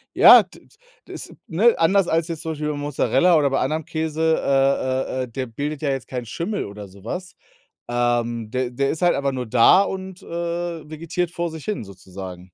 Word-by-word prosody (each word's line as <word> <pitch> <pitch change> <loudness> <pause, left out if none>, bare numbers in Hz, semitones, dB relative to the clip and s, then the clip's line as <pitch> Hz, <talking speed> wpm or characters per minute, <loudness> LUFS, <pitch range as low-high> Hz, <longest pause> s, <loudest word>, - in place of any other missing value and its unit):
Ja, - - +9
d - - -20
d - - -26 0.4
das, - - -8 0.2
ne 220 +8 +3
anders 190 +3 +3
als 165 0 +1
jetzt 165 -3 -5
zum 160 - -4
Beispiel 150 -1 -3
bei 145 - -5
Mozzarella 145 +3 +2
oder 145 -2 +2
bei 135 - 0
anderem 155 +2 -1
Käse 160 0 -3 0.2
äh, 135 -1 +1
äh, - - 0
äh, - - -6
der 130 +2 -4
bildet 145 +6 -5
ja 145 - 0
jetzt 135 -2 -3
keinen 125 -2 -5
Schimmel 170 - -3
oder 100 0 -9
sowas, 115 - -7 0.5
ähm, 120 -2 0
de 130 -1 -2
der 135 +2 0
ist 160 - -3
halt 175 - +4
einfach 140 -1 0
nur 125 -2 -4
da 120 - +5
und, 190 -1 -6
äh, - - -15 0.6
vegetiert 170 +2 -3
vor 170 -1 -3
sich 160 -2 -9
hin 210 - -3
sozusagen. 95 -2 -10
140 Hz, 200 wpm, -22 LUFS, 120-165 Hz, 0.6 s, Ja